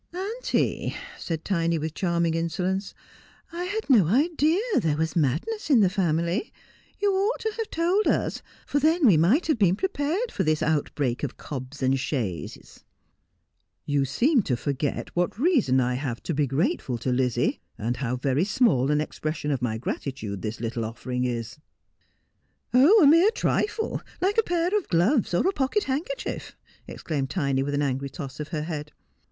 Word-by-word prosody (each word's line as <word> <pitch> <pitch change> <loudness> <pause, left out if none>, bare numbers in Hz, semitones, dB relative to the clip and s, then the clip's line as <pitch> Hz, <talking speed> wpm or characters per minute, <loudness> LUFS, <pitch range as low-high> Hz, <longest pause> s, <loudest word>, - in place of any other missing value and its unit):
' - - -44
Auntie,' 425 +7 -1 0.2
said 165 -2 -4
Tiny, 170 -3 +1
with 155 0 -3
charming 170 -3 0
insolence, 180 +4 -2 0.3
' - - -29
I 350 +1 -3
had 425 +4 -3
no 220 - +5
idea 310 - +2 0.2
there 155 -3 0
was 160 +2 -1
madness 165 - -1
in 255 -7 +6
the 190 -3 +3
family. 170 - 0 0.5
You 405 -1 +2
ought 400 +5 0
to 440 -1 -2
have 450 -2 -3
told 355 +6 +1
us; - - 0 0.2
for 285 - 0
then 320 +2 +3
we 205 -8 +7
might 190 - +3
have 310 -7 +1
been 190 -3 +4
prepared 370 - -1
for 190 - -1
this 155 -2 +1
outbreak 145 -4 0
of 145 - -4
cobs 135 0 -7
and 130 +1 +2
chaises.' 115 - -4 1.0
You 145 -1 +1
seem 245 - +2
to 125 -10 -1
forget 140 +2 -3
what 175 +3 0
reason 245 - +3
I 125 0 +1
have 125 -2 -4
to 170 - -2
be 145 -1 +1
grateful 135 - -1
to 125 +3 -2
Lizzie, 125 -1 0 0.2
and 120 +3 -2
how 125 -2 -2
very 135 +4 +1
small 200 - +2
an 150 0 +2
expression 155 -1 -3
of 135 -3 -1
my 110 -3 -1
gratitude 110 -4 -4
this 110 0 -4
little 115 0 -3
offering 125 +3 -3
is.' 120 +1 -4 0.6
' - - -45
Oh, 320 - +7
a - - +7
mere 330 +8 +7
trifle, 445 0 -1 0.2
like 400 +4 +2
a - - +7
pair 350 0 0
of 415 - 0
gloves 200 - +2
or 260 - +2
a 390 - +2
pocket 290 +9 0
handker 315 - -2
chief,' - - -6 0.3
exclaimed 140 -5 -3
Tiny, 140 -7 0
with 145 +1 -1
an 145 - +1
angry 135 0 -2
toss 140 -3 -8
of 150 - -4
her 155 -2 -3
head. 150 -2 -5
165 Hz, 180 wpm, -25 LUFS, -, 1.0 s, we